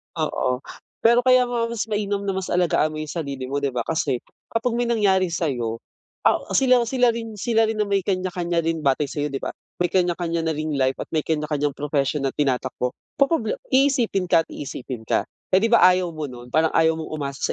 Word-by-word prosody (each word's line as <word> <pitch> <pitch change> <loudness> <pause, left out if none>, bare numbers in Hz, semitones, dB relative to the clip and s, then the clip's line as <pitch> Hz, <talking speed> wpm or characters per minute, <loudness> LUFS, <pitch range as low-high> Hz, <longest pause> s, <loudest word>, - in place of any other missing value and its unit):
Oo. 135 -5 -1 0.4
Pero 235 +1 +6
kaya 255 -1 +6
nga 235 -1 -1
mas 230 -2 -2
mainam 205 -1 -1
na 200 - -1
mas 190 -1 -3
alagaan 170 -3 +2
mo - - -6
yung 155 -1 -5
sarili 140 -6 -4
mo, 140 +2 -1
'di 140 -1 -1
ba? 120 - 0
Kasi 145 -5 -1 0.3
kapag 230 +2 0
may 240 0 0
nangyari 195 -5 +3
sa'yo, 125 -9 -2 0.5
ah, - - +5 0.2
sila 255 -2 +5
sila 250 -1 +3
rin 225 -1 -6
sila 225 +1 +2
rin 220 0 -2
na 210 - +1
may 200 -1 +1
kanya-kanya 180 -3 -1
rin 165 0 -1
batay 140 +1 +1
sa'yo, 145 +1 -2
'di 135 - -3
ba? - - -2 0.3
May 175 - +1
kanya 175 -2 +2
kanya 170 -1 -1
na 160 - +1
ring 155 0 -2
life 130 -1 +1
at - - -5
may 155 - +2
kanya 150 -1 -1
kanyang 145 -2 -1
profession 145 0 -1
na 135 - 0
tinatakbo. 130 -3 -1 0.3
Poproble 275 -6 +2
iisipin 260 -8 +2
ka 165 -1 +5
at - - -59
iisipin 130 -4 -7
ka. - - +1 0.3
Eh, 185 - +7
'di 225 - +2
ba, 235 - +7
ayaw 180 -1 +4
mo 155 -2 -5
nun. 125 -1 -11
Prang 160 +2 +2
ayaw 160 0 +3
mong 160 - -6
umasa 140 -3 -4
165 Hz, 215 wpm, -23 LUFS, 145-215 Hz, 0.5 s, Eh